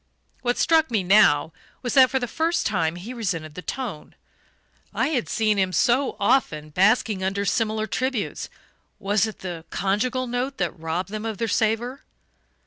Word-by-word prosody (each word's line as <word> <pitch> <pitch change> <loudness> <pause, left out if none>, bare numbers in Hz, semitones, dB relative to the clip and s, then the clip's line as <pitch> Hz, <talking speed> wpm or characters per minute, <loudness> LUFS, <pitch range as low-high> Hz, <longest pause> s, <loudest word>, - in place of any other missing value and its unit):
What 245 -1 0
struck 320 -2 +3
me 220 -5 0
now 165 -5 +4 0.3
was 245 - -2
that, 260 -2 +7
for 265 - 0
the 245 -2 -2
first 330 +7 0
time, 170 -5 0
he 195 +8 -7
resented 170 -10 -3
the 180 - -7
tone. 215 -3 -6 0.8
I - - +1
had 260 -7 -1
seen 215 -2 +1
him, 190 -1 +1
so 245 - +2
often, 155 - +1
basking 200 +2 +2
under 195 +2 -1
similar 215 +2 0
tributes 255 0 -2 0.5
was 205 +2 +1
it 220 - -9
the 175 -3 -6
conjugal 235 +7 0
note 250 +3 -3
that 175 -3 0
robbed 165 +2 -3
them 215 +1 -5
of 220 -2 -4
their 230 - -1
savour? 225 +5 0
215 Hz, 165 wpm, -24 LUFS, 185-245 Hz, 0.8 s, that